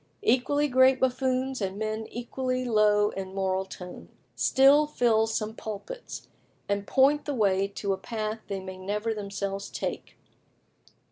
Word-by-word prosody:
Equally 290 Hz, -, +2 dB
great 260 Hz, 0 st, +5 dB
buffoons, 260 Hz, 0 st, 0 dB
and 195 Hz, 0 st, -2 dB
men 220 Hz, +1 st, -3 dB
equally 255 Hz, +1 st, -3 dB
low 210 Hz, -2 st, +3 dB
in 190 Hz, 0 st, -6 dB
moral 190 Hz, 0 st, 0 dB
tone, 180 Hz, -1 st, -10 dB, 0.3 s
still 280 Hz, +3 st, +5 dB
fill 225 Hz, -6 st, +2 dB
some 220 Hz, -1 st, -2 dB
pulpits, 225 Hz, -, -7 dB, 0.4 s
and 200 Hz, 0 st, -2 dB
point 280 Hz, +2 st, +3 dB
the 290 Hz, -, -2 dB
way 195 Hz, -3 st, +2 dB
to 200 Hz, 0 st, -2 dB
a -, -, -3 dB
path 215 Hz, +1 st, -4 dB
they 195 Hz, -1 st, -3 dB
may 185 Hz, 0 st, -8 dB
never 210 Hz, +4 st, -2 dB
themselves 200 Hz, -1 st, -4 dB
take. -, -, -5 dB
220 Hz, 140 wpm, -27 LUFS, 200-260 Hz, 0.4 s, great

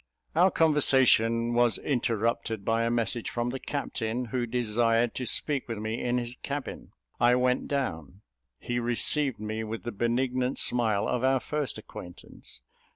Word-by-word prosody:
Our 180 Hz, +4 st, +5 dB
conversation 130 Hz, -8 st, +3 dB
was 120 Hz, -1 st, +3 dB
interrupted 115 Hz, -4 st, -1 dB
by 115 Hz, 0 st, +1 dB
a -, -, +1 dB
message 120 Hz, 0 st, -1 dB
from 120 Hz, 0 st, -2 dB
the 135 Hz, -, -4 dB
captain, 125 Hz, -4 st, -3 dB
who 125 Hz, -2 st, 0 dB
desired 115 Hz, 0 st, +1 dB
to 125 Hz, -, -4 dB
speak 145 Hz, -3 st, 0 dB
with 115 Hz, -2 st, -4 dB
me 110 Hz, +2 st, -3 dB
in 125 Hz, 0 st, +1 dB
his 120 Hz, +1 st, -4 dB
cabin. 140 Hz, -1 st, -5 dB, 0.3 s
I 120 Hz, +1 st, +5 dB
went 125 Hz, 0 st, +1 dB
down; 95 Hz, -, -3 dB, 0.4 s
he 120 Hz, 0 st, -3 dB
received 120 Hz, +2 st, +1 dB
me 110 Hz, +1 st, -4 dB
with 110 Hz, +1 st, -5 dB
the 120 Hz, -, -4 dB
benignant 125 Hz, +3 st, 0 dB
smile 110 Hz, -5 st, +1 dB
of 125 Hz, -, -1 dB
our 130 Hz, 0 st, +3 dB
first 150 Hz, +1 st, -3 dB
acquaintance. 90 Hz, -7 st, -11 dB
120 Hz, 155 wpm, -28 LUFS, 115-130 Hz, 0.4 s, Our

